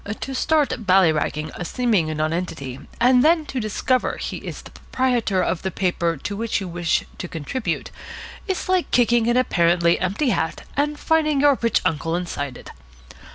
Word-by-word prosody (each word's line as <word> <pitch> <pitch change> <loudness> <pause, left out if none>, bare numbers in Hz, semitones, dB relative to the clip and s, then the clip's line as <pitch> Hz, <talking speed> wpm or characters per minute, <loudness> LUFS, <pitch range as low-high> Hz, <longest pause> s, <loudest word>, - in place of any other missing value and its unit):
To 270 - -4
start 270 -5 0
bally 185 -3 +5
ragging 155 0 -2
a - - -5
seeming 215 -4 +1
nonentity 155 -4 -3 0.2
and 250 +1 +5
then 320 0 +4
to 265 - -4
discover 240 +4 0
he - - -4
is - - -8
the - - -13
proprietor 240 -7 0
of 170 0 -1
the 190 - -2
paper 175 -3 -1
to 200 +9 -5
which 225 +2 -1
you 195 - -5
wish 175 -1 0 0.2
to 175 - -4
contribute 165 - -4 0.6
is 380 -2 -2
like 370 -1 +1
kicking 240 -1 +3
an 240 +1 +3
apparently 170 -7 +3
empty 200 +10 0
hat 160 -8 -1
and 295 +1 0
finding 305 -3 +2
your 290 -1 +5
rich 230 -2 +2
uncle 165 +1 0
inside 145 -7 -4
it. - - -11
200 Hz, 170 wpm, -22 LUFS, 170-255 Hz, 0.6 s, bally